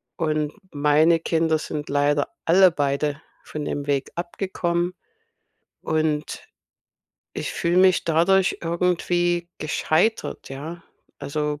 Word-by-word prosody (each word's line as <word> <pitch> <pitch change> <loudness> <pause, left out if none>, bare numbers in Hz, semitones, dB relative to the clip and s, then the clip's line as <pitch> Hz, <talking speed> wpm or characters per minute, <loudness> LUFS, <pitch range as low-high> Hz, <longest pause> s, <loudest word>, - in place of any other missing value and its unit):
Und 155 -3 -1 0.2
meine 150 +3 +4
Kinder 160 -1 +1
sind 150 -1 -5
leider 145 0 +1 0.2
alle 185 +2 +6
beide 145 0 -1 0.2
von 150 -1 -6
dem 145 0 -4
Weg 140 -1 0
abgekommen 175 0 -2 0.9
und 155 -1 -1 0.9
ich - - -4
fühle 175 +2 +1
mich 185 -1 +4
dadurch 175 +4 +3
irgendwie 175 0 0
gescheitert, 160 +7 0
ja? 155 +6 -7 0.4
Also, 150 +1 -3
160 Hz, 105 wpm, -23 LUFS, 150-175 Hz, 0.9 s, alle